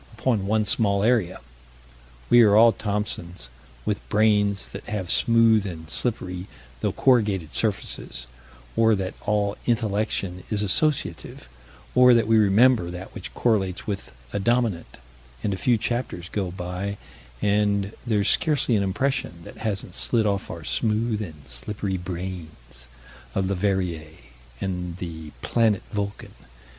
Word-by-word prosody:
upon 110 -7 0
one 110 +1 +2
small 100 -2 +2
area. 110 -6 +2 0.9
We 120 - +7
are 105 -3 +6
all 115 +2 +8
Thomsons, 100 - -4 0.4
with - - -3
brains 105 -2 +2
that - - -9
have 95 -5 -3
smooth 115 -3 +4
and 80 -3 -7
slippery, 90 -6 -2 0.3
though - - 0
corrugated, 105 - +2
surfaces 65 - -2 0.5
or 115 -1 +4
that 95 -2 -3
all 105 -1 +1
intellection 105 -5 0
is 105 -2 0
associative 95 - -1 0.5
or 125 -1 +7
that 115 -2 +3
we 110 0 +4
remember 105 -1 +4
that 90 +2 -8
which - - -7
correlates 95 -6 0
with 100 -10 -4 0.2
a - - 0
dominant 115 -4 0 0.5
and 100 - 0
a - - -1
few 120 +5 +2
chapters 110 -6 -3
go 100 -3 -2
by, 90 +3 -4 0.4
and 100 - +1
there's 105 -4 +1
scarcely 145 -7 +3
an 100 - +2
impression 95 -3 -1
that - - -11
hasn't 100 -5 -3
slid 115 +2 +2
off 100 -1 -1
our 85 -1 -7
smooth 110 +4 0
and 80 -9 -8
slippery 95 - -4
brains, 85 -9 -7 0.5
of 95 - +1
Leverrier 90 -5 -1 0.4
and 90 -2 -3
the 80 -4 -7
"planet 110 -4 +2
Vulcan." 100 -1 -4
100 Hz, 135 wpm, -24 LUFS, 90-110 Hz, 0.9 s, all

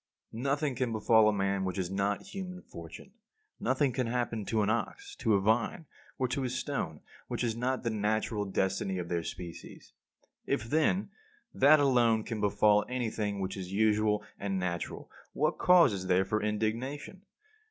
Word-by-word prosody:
46. 115 +3 -6
Nothing 140 0 0
can 125 -2 -1
befall 110 0 +4
a - - +3
man 100 -1 0
which 95 -1 -3
is 95 -1 -2
not 100 +1 0
human 185 -2 -7
fortune. 85 - -11 0.5
Nothing 130 +1 +1
can 125 0 -1
happen 115 -3 -2
to 110 0 +1
an 100 - +1
ox, 400 - -3
to 110 -4 +2
a - - +3
vine, 110 - +1 0.3
or 130 - +1
to 135 +2 -1
a 125 - -1
stone 125 - -3 0.3
which - - -3
is 115 -2 0
not 125 +2 -1
the 115 - 0
natural 105 0 0
destiny 95 0 -1
of 85 -1 -4
their 85 -1 0
species. 85 0 -9 0.5
If, - - 0
then, 160 - +1 0.4
that 145 +3 +6
alone 120 -5 +3
can 110 -2 -4
befall 105 0 +4
anything 110 -5 -2
which 95 0 -3
is 95 -2 -6
usual 105 0 +2 0.2
and 100 -1 -2
natural, 85 -2 -4 0.2
what - - 0
cause 180 - +6
is 95 -1 -4
there 95 +1 +3
for 105 +3 -1
indignation? 115 - -2
110 Hz, 175 wpm, -30 LUFS, 100-130 Hz, 0.5 s, that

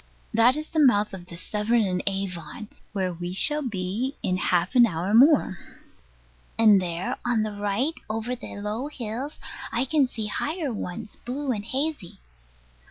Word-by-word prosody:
That 230 +4 +5
is 305 +1 -5
the 320 - 0
mouth 215 -8 +4
of 180 -2 -8
the 170 - -9
Severn 215 +5 +1
and 180 -2 0
Avon; 195 +1 -3 0.2
where 190 -3 -1
we 175 +1 -5
shall 295 +11 +4
be 225 +3 -2
in 185 - +1
half 180 +1 +1
an 245 -2 +7
hour 180 +2 -2
more. 255 - +5 1.0
And 215 -4 +6
there, 175 0 -3
on 240 -3 +1
the 215 - -2
right, 205 +9 0 0.2
over 225 +3 -2
the 245 - -8
low 210 +6 -3
hills, 260 +1 -5 0.3
I 245 +3 +1
can 280 0 +3
see 225 -3 -5
higher 295 - -2
ones, 200 0 -6
blue 270 +3 -2
and 210 -4 -2
hazy. 260 - -3
215 Hz, 165 wpm, -25 LUFS, 190-255 Hz, 1.0 s, an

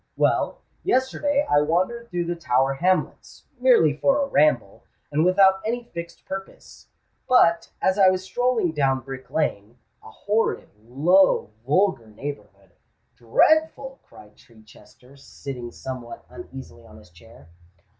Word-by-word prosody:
Well, - - 0 0.2
yesterday 285 -2 0
I 145 0 +3
wandered 185 +10 -1
through 175 -1 -2
the 175 +1 -3
Tower 135 -4 +1
Hamlets—merely 185 - 0
for 275 0 +2
a 280 - +1
ramble—and 150 - -1
without 190 +1 +4
any 240 +2 -2
fixed 170 0 -8
purpose: 190 0 -9 0.4
but, 170 -9 +4
as 190 +2 +1
I 190 -1 +7
was 185 0 -1
strolling 240 -2 0
down 135 -3 0
Brick 130 +1 -9
Lane—a 115 -7 -5
horrid, 210 - -2
low, 155 - +2 0.2
vulgar 180 - +1
neighbourhood——" 105 -5 -9 0.4
"Dreadful!" 275 - +1
cried 105 0 -18
Chichester, 115 +4 -20
sitting 130 -3 -8
somewhat 125 -1 -8
uneasily 135 - -11
on 110 -1 -16
his 105 -4 -18
chair. 85 -2 -18
165 Hz, 120 wpm, -23 LUFS, 125-205 Hz, 0.4 s, I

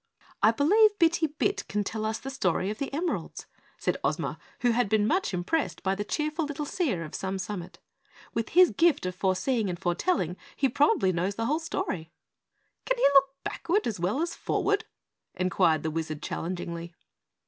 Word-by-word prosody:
"I - - +7
believe 410 - +4
Bitty 330 -2 +3
Bit 305 +7 -1
can 210 0 -1
tell 215 +2 -3
us 220 0 -1
the 270 - -7
story 190 -5 0
of 215 - -7
the 275 - -3
emeralds," 330 +5 -3 0.3
said - - -1
Ozma, - - -1 0.2
who 245 - +4
had 230 -2 +1
been 215 0 +3
much 365 - +1
impressed 190 - -1
by 190 - +1
the 200 +1 -2
cheerful 305 +8 -1
little 295 0 -3
seer 275 - -1
of 155 - -9
Some 190 0 -3
Summit. 190 -2 -6 0.6
"With 230 -1 -2
his 365 0 +6
gift 330 - +3
of 185 - -2
foreseeing 195 +4 0
and 175 - -3
foretelling 180 - 0 0.2
he 270 - +2
probably 235 -8 +3
knows 180 +4 -1
the 225 - -2
whole 300 +6 +1
story." 320 - -3 0.8
"Can - - +1
he - - +3
look 275 0 +5
backward 395 +5 -1
as 220 -6 -2
well 205 - 0
as 340 0 -3
forward?" 410 +1 0 0.5
inquired 180 -4 +2
the 160 - -1
Wizard 155 -1 -4
challengingly. 170 -1 -4
220 Hz, 180 wpm, -28 LUFS, -, 0.8 s, I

